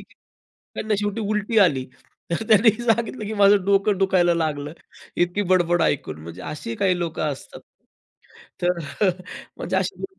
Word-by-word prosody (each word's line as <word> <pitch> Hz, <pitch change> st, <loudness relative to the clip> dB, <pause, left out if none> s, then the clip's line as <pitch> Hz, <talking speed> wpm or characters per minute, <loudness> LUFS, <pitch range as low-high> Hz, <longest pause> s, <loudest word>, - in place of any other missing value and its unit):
की -, -, -18 dB, 0.6 s
त्यांना 215 Hz, 0 st, -1 dB
शेवटी 205 Hz, +2 st, -2 dB
उलटी 210 Hz, +1 st, 0 dB
आली. 145 Hz, -10 st, +3 dB, 0.5 s
तर 170 Hz, +6 st, -1 dB
त्यांनी 220 Hz, +1 st, +6 dB
सांगितलं, 230 Hz, 0 st, 0 dB
की 215 Hz, -, -4 dB
"माझं 200 Hz, -1 st, +5 dB
डोकं 200 Hz, 0 st, +2 dB
दुखायला 180 Hz, -3 st, +3 dB
लागलं. 150 Hz, -3 st, -2 dB, 0.4 s
इतकी 175 Hz, +4 st, +1 dB
बडबड 175 Hz, -1 st, +3 dB
ऐकून." 80 Hz, -, -1 dB
म्हणजे 85 Hz, +3 st, -9 dB
अशी 230 Hz, +10 st, -6 dB
काही 190 Hz, -4 st, +1 dB
लोकं 170 Hz, -2 st, -3 dB
असतात. 135 Hz, -, -11 dB, 1.0 s
तर 175 Hz, 0 st, +1 dB, 0.8 s
म्हणजे -, -, -2 dB
अशी 400 Hz, -, -2 dB
लोकं 385 Hz, 0 st, -8 dB
195 Hz, 145 wpm, -23 LUFS, 170-215 Hz, 1.0 s, त्यांनी